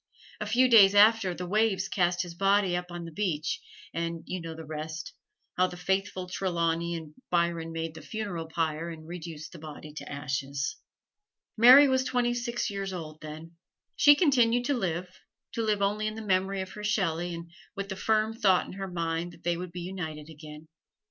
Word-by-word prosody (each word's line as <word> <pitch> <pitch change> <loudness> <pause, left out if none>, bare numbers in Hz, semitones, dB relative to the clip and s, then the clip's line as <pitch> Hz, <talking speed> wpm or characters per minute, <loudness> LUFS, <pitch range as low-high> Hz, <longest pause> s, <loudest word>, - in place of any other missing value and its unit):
A 210 - -3
few 245 +4 +4
days 205 -5 +7
after, 205 -3 +5
the 180 - -5
waves 195 0 +1
cast 175 -2 +1
his 175 -1 -8
body 195 0 +2
up 180 0 -3
on 175 -1 -6
the 165 - -8
beach, 155 -4 -2 0.3
and 165 0 -3
you 185 -1 -4
know 165 -1 -6
the 160 0 -8
rest 155 +2 -6 0.4
how 185 0 +4
the 180 - -9
faithful 190 0 -1
Trelawney 170 -2 -1
and 160 -2 -8 0.2
Byron 170 -1 0
made 165 -1 -4
the 160 - -10
funeral 200 -7 -4
pyre 160 0 -2
and 160 -1 -9
reduced 165 -2 -7
the 170 - -11
body 150 -1 -9
to 155 - -8
ashes. 140 +1 -3 0.8
Mary 255 +5 +9
was 260 -1 +2
twenty 245 -2 +1
six 240 -2 -2
years 195 -1 -4
old 155 -3 -7
then. 160 +2 -9 0.4
She 290 0 +7
continued 245 -6 +3
to 285 - +1
live 180 -7 -2 0.4
to 230 - -2
live 210 -2 +1
only 210 +2 0
in 215 - -4
the 220 -1 -7
memory 190 0 +1
of 190 - -6
her 210 - -8
Shelley 175 -5 0
and 170 0 -9 0.2
with 200 0 -4
the 190 - -3
firm 220 +2 +1
thought 200 -6 +3
in - - -9
her 195 0 -5
mind 170 0 -2
that - - -18
they 175 0 +1
would 180 0 -6
be 175 0 -6
united 160 -4 -6
again. 150 0 -11
180 Hz, 195 wpm, -28 LUFS, 165-205 Hz, 0.8 s, Mary